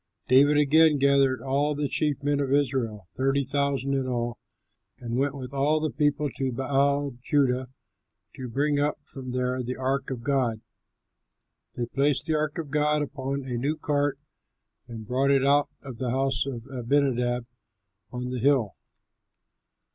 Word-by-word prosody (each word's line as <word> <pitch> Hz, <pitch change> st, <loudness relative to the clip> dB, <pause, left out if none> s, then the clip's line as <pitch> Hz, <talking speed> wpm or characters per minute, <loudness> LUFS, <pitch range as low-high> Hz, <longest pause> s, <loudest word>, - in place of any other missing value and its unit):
David 140 Hz, +3 st, +5 dB
again 150 Hz, +1 st, +5 dB
gathered 140 Hz, -1 st, +3 dB
all 140 Hz, +2 st, 0 dB
the 145 Hz, 0 st, -1 dB
chief 145 Hz, -1 st, -1 dB
men 145 Hz, 0 st, +1 dB
of 140 Hz, -2 st, -1 dB
Israel, 125 Hz, -8 st, 0 dB
thirty 135 Hz, +2 st, +1 dB
thousand 140 Hz, 0 st, 0 dB
in 135 Hz, -1 st, 0 dB
all, 120 Hz, -1 st, -2 dB, 0.6 s
and 120 Hz, -1 st, -5 dB
went 140 Hz, +2 st, 0 dB
with 130 Hz, 0 st, -8 dB
all 145 Hz, +3 st, +2 dB
the 155 Hz, 0 st, -1 dB
people 145 Hz, -1 st, +1 dB
to 135 Hz, -2 st, -1 dB
Baal 140 Hz, +2 st, +1 dB
Judah, 130 Hz, -2 st, +1 dB, 0.7 s
to 130 Hz, -2 st, -6 dB
bring 145 Hz, +4 st, +1 dB
up 145 Hz, +1 st, +1 dB
from 130 Hz, -2 st, -7 dB
there 125 Hz, 0 st, -1 dB
the 125 Hz, +1 st, -4 dB
ark 135 Hz, +1 st, -1 dB
of 125 Hz, -3 st, -5 dB
God. 130 Hz, -5 st, 0 dB, 1.2 s
They 120 Hz, -, -2 dB
placed 140 Hz, +3 st, 0 dB
the 160 Hz, -, 0 dB
ark 150 Hz, -1 st, -1 dB
of 155 Hz, -4 st, -5 dB
God 150 Hz, 0 st, +2 dB
upon 140 Hz, -1 st, -4 dB
a 125 Hz, -2 st, -4 dB
new 145 Hz, +6 st, -1 dB
cart 145 Hz, -1 st, 0 dB, 0.7 s
and 115 Hz, -2 st, -8 dB
brought 130 Hz, +5 st, +1 dB
it 135 Hz, -1 st, +3 dB
out 145 Hz, +1 st, +3 dB
of 130 Hz, -5 st, -8 dB
the 130 Hz, -, -1 dB
house 135 Hz, +1 st, 0 dB
of 120 Hz, -4 st, -5 dB
Abinadab 125 Hz, -2 st, 0 dB, 0.7 s
on 125 Hz, 0 st, -4 dB
the 125 Hz, -, -3 dB
hill. 125 Hz, -6 st, +2 dB
135 Hz, 160 wpm, -26 LUFS, 125-145 Hz, 1.2 s, David